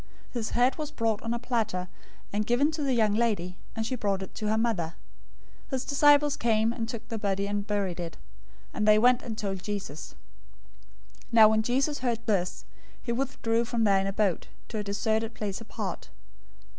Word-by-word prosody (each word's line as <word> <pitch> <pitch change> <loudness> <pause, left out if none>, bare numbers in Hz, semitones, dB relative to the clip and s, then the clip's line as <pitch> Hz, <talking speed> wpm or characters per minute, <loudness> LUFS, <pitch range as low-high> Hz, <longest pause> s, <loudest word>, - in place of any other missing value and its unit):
014:011 - - -27
His 235 -3 -2
head 250 +2 +3
was 300 -1 -3
brought 225 -6 -1
on 230 - -3
a 235 - 0
platter, 225 -7 -1 0.5
and 210 +1 0
given 270 +6 +3
to 310 -1 -4
the 270 -3 +1
young 215 -3 +3
lady: 205 -6 0 0.2
and 225 - -2
she 255 - -1
brought 200 -4 -1
it 190 - -10
to 215 - -3
her 215 +1 +2
mother. 195 -8 0 0.7
014:012 - - -26
His 260 -1 -2
disciples 290 0 +4
came, 225 0 +2
and 230 -2 -4
took 230 -2 -6
the 225 - -3
body, 200 -1 0
and 205 0 -2
buried 195 -4 -1
it; 165 -3 -5 0.6
and 210 - 0
they 215 0 +7
went 250 +3 +5
and 225 -3 -6
told 195 -3 -3
Jesus. 190 -7 -5 1.2
014:013 - - -21
Now 220 -2 +9
when 220 0 +3
Jesus 270 +6 0
heard 235 -3 -1
this, 185 -5 -1 0.4
he 235 - -2
withdrew 235 -2 0
from 230 -1 -1
there 200 -2 +4
in 195 - -1
a - - 0
boat, 200 -4 0 0.2
to 220 - -3
a - - -2
deserted 220 +2 -1
place 205 0 -4
apart. 225 - -5
220 Hz, 200 wpm, -28 LUFS, 205-240 Hz, 1.2 s, Now